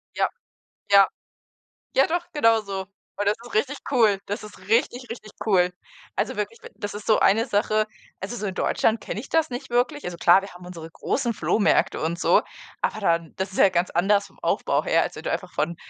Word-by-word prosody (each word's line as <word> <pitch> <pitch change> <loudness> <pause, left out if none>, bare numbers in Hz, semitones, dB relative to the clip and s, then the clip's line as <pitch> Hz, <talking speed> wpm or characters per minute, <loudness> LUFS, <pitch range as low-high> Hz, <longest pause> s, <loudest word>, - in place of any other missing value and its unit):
Ja. - - +2 0.6
Ja. 195 -1 +8 0.9
Ja, 270 - +5
doch, 345 +1 -1
genauso. 215 -8 +1 0.3
Und 205 0 -2
das 205 - +4
ist 240 - -11
richtig 275 +6 +1
cool. 220 -7 +4
Das 205 +2 -4
ist 210 -1 -11
richtig, 245 +2 +1
richtig 215 -3 -8
cool. 180 -4 +3 0.4
Also, - - -1
wirklich, 460 - -3 0.2
das 205 0 -6
ist 205 - -8
so 220 - +4
eine 225 +4 +4
Sache 215 0 +1 0.3
Also, 205 +6 -5
so, 210 - -3
in 190 - -3
Deutschland 225 0 +1
kenne 215 - -5
ich 275 - -11
das 325 -2 +1
nicht 255 +2 -6
wirklich. 255 +5 0
Also, 175 -1 -5
klar, 175 +3 +6
wir 195 - -9
haben 180 - -12
unsere 170 -2 -8
großen 240 +5 -1
Flohmärkte 210 +1 +2
und 165 +2 -2
so, - - +4 0.4
aber 215 - -1
dann 170 -4 0
das 190 +1 -3
ist - - -7
ja 195 - +7
ganz 180 0 0
anders 200 +3 +2
vom - - -25
Aufbau - - 0
her, - - +3
als - - -3
wenn - - -9
du - - -2
einfach - - -3
von 170 +1 -1
210 Hz, 210 wpm, -24 LUFS, 190-235 Hz, 0.9 s, Ja